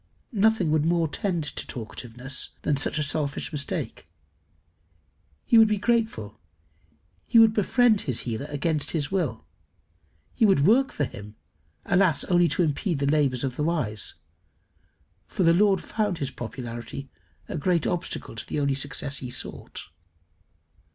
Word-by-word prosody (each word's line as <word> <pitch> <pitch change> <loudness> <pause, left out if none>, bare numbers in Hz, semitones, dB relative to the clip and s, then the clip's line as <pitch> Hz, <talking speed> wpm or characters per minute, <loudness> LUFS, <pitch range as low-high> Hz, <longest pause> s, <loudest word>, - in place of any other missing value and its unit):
Nothing 210 -5 +3
would 155 -1 +3
more 170 0 +2
tend 175 +1 -1
to 150 - -4
talkativeness 125 +3 -4
than 150 - +2
such 140 +2 -1
a 150 - +1
selfish 145 0 -1
mistake. 145 -3 -3 1.4
He 230 - +6
would 220 - +7
be 210 -1 +1
grateful. 210 - -1 0.9
He - - +3
would 225 -1 +7
befriend 220 +1 +3
his 130 -5 -1
healer 120 +4 -4
against 150 +1 0
his 145 +2 -2
will. 190 -1 -1 0.9
He 235 - 0
would 190 -9 +5
work 255 +7 +4
for 145 - -2
him 105 -5 -7 0.5
alas! 180 -5 +3
only 175 -1 +3
to 175 - +1
impede 160 +2 0
the 140 - -1
labours 140 -5 +2
of 130 -2 -3
the 150 - 0
Wise; 135 - -1 1.1
for 190 - -1
the 165 0 +5
Lord 195 +1 +3
found 210 -5 -1
his 140 -4 -3
popularity 120 +1 -7 0.4
a - - -5
great 170 +1 +1
obstacle 175 0 -3
to - - -6
the - - -2
only 140 -1 +1
success 140 0 -3
he 125 - -6
sought. 125 - -6
155 Hz, 150 wpm, -26 LUFS, 135-190 Hz, 1.4 s, would